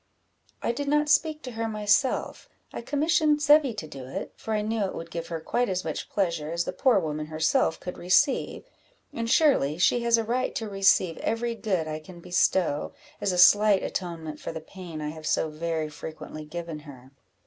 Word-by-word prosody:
"I - - +1
did 280 +4 -4
not 295 +1 +2
speak 305 +2 +2
to 255 - -6
her 225 0 -3
myself 215 +4 0 0.2
I - - -5
commissioned 300 +3 +2
Zebby 295 -4 +4
to 170 -7 -6
do 135 -3 -9
it, 130 - -6
for 220 - -3
I 210 - 0
knew 220 0 -1
it 190 - -5
would 165 0 -7
give 170 0 -5
her 165 -1 -4
quite 240 +9 -1
as 185 -1 -2
much 155 - -4
pleasure 170 -6 -1
as 170 +1 0
the - - -4
poor 250 +4 +3
woman 155 -4 -2
herself 160 +1 +1
could 180 - -7
receive; 260 - +2 0.5
and 230 0 -3
surely 230 - +3
she 190 +7 +3
has 235 0 +4
a 230 - 0
right 245 +3 -1
to 225 -5 -3
receive 195 -4 +3
every 235 +1 -1
good 190 -8 -1
I 155 0 -4
can 175 +3 -13
bestow, 175 -3 +1 0.3
as 200 - +1
a 180 - -2
slight 205 +2 +6
atonement 165 -4 -5
for - - -5
the 160 - -6
pain 165 -1 -9
I 150 - -3
have 155 0 -7
so 160 - +1
very 160 0 -2
frequently 155 0 -8
given 165 0 -6
her." 135 -4 -13
185 Hz, 200 wpm, -26 LUFS, 160-230 Hz, 0.5 s, slight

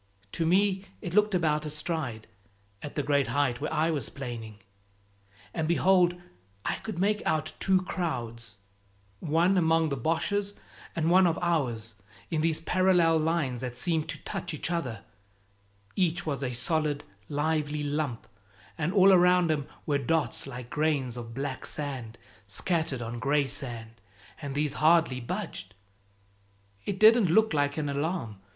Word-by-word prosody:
To 165 - -1
me 190 +2 +2
it 175 - -6
looked 210 0 +3
about 155 -3 +1
a 155 - -4
stride, 150 -7 -3 0.6
at 145 - -7
the 145 - 0
great 140 -1 +2
height 130 0 0
where 150 - -2
I 160 +2 +2
was 150 -4 -3
planing. 115 -6 -7 1.0
And 160 -2 -1
behold 175 +1 +3 0.5
I - - 0
could 215 -5 -6
make 210 +3 +1
out 155 0 -1
two 190 -1 +2
crowds, 120 - -4 0.6
one 170 +5 +2
among 160 -1 +3
the 140 - -1
Boches, 200 - -1 0.4
and 165 0 +1
one 185 0 +6
of 165 - 0
ours, 125 -10 -1 0.4
in 160 -2 +1
these 160 0 +1
parallel 175 -1 +3
lines 155 -6 0
that 125 -1 -5
seemed 160 +2 -1
to - - -3
touch 160 - -4
each 155 - -3
other; 125 -12 -3 0.9
each 175 -2 +1
was 140 -3 -2
a 125 - -1
solid, 145 +3 0 0.3
lively 150 0 -1
lump, 145 -4 -2 0.5
and 160 +3 0
all 195 -1 +7
around 180 -2 +5
'em 145 -2 -1 0.2
were 145 -2 +1
dots 140 -2 0
like 125 -1 -8
grains 145 -5 0
of 115 -1 -8
black 135 -1 -4
sand 130 -6 -4 0.3
scattered 150 - -1
on 120 +1 -5
gray 140 +3 +2
sand, 115 -5 -6 0.4
and 140 -2 -5
these 145 -1 0
hardly 160 -5 +4
budged 100 -5 -5 1.1
it 195 - -2
didn't 220 -3 +7
look 220 +3 +4
like 145 0 +1
an 150 -2 -1
alarm! 145 - -2
155 Hz, 150 wpm, -28 LUFS, 130-170 Hz, 1.1 s, all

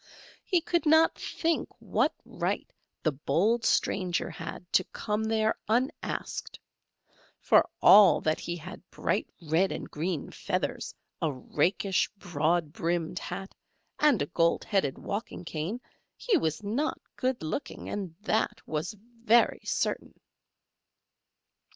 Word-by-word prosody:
He 355 -2 +2
could 345 -1 0
not 320 +1 +6
think 330 -1 -1
what - - +1
right - - -2 0.4
the 155 - +3
bold 205 - +1
stranger 180 -3 +1
had - - -7
to 185 - +5
come 210 0 -2
there 220 0 +1
unasked; 250 +5 -2 0.8
for - - +4
all 205 -3 +9
that 155 0 +1
he 175 - -4
had 175 +2 -9
bright - - -1 0.2
red 165 +5 +2
and - - -5
green 160 0 -3
feathers, - - -3 0.3
a 160 - +1
rakish, 175 +8 0
broad 170 -3 0
brimmed 170 0 -1
hat, 195 0 -6 0.5
and 290 - +4
a 145 - -9
gold 170 0 +2
headed 190 -10 0
walking 200 -3 -5
cane, 165 +9 -3 0.4
he 475 -5 +1
was 160 - 0
not 240 +10 -1 0.2
good 255 -5 -1
looking, 185 - -4
that 215 +1 0
was 160 +7 -3 0.3
very 235 +1 +4
certain. - - -2
190 Hz, 120 wpm, -29 LUFS, 165-230 Hz, 0.8 s, all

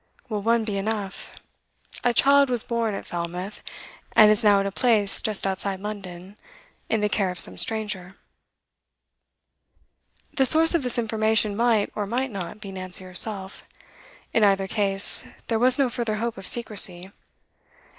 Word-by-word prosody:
'Will 210 -2 -3
one 230 +2 +1
be 210 -2 -4
enough? 205 -2 -4 0.7
A 245 - +3
child 280 +3 +4
was 245 -3 -2
born 230 -3 -2
at - - -7
Falmouth, 175 +4 -6 0.5
and 215 -1 +7
is 215 +2 0
now 205 -2 +5
at 195 - -1
a 200 - -3
place 215 -3 +3
just 215 -3 -1
outside 195 0 -2
London, 195 -2 -8 0.5
in 220 - 0
the 210 - +2
care 200 -2 -1
of 180 - -6
some - - +6
stranger.' 205 -4 -4 2.2
The 265 -2 +4
source 325 +3 +6
of 340 - +1
this 250 -2 -1
information 220 -2 +1
might, 230 -2 +1
or 205 -1 -4
might 255 +4 -2
not, 195 0 -7
be 200 -2 -9
Nancy 185 -1 -7
herself. 190 +1 -5 0.7
In 225 - +2
either 195 -1 +2
case, 195 -2 +2 0.3
there 225 -2 0
was 250 +1 +4
no 275 -2 +2
further 235 -2 -3
hope 230 +1 -3
of 195 -1 -10
secrecy. 195 -5 +1
210 Hz, 155 wpm, -24 LUFS, 195-230 Hz, 2.2 s, and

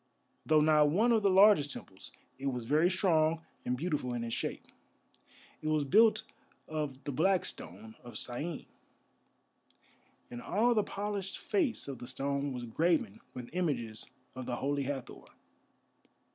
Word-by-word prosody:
Though 155 -1 +5
not 150 -1 +5
one 215 +10 +3
of 225 -2 +4
the 200 - +3
largest 190 -7 +6
temples, 95 - -11 0.3
it 140 - -3
was 125 -3 -2
very 155 +7 +3
strong 165 -3 +2 0.2
and 125 0 -1
beautiful 145 -5 -2
in 120 - -3
its 115 -1 -4
shape. - - -3 1.0
It 155 - -4
was 155 -1 +2
built 215 +10 +5 0.4
of 150 -4 -4
the 145 - -3
black 185 +7 +2
stone 110 +5 -7
of 120 - -8
Syene, 145 +7 -3 1.7
and 120 0 -6
all 230 - +2
the 215 - +3
polished 200 -1 -4
face 315 - 0
of 135 -3 -6
the 120 - -8
stone 140 +2 -2
was 125 -2 -5
graven 155 - 0
with 125 +2 -8
images 125 -11 -2 0.2
of 130 -1 -7
the 125 - -1
Holy 140 +2 -1
Hathor. 135 -2 -5
150 Hz, 150 wpm, -32 LUFS, 125-180 Hz, 1.7 s, largest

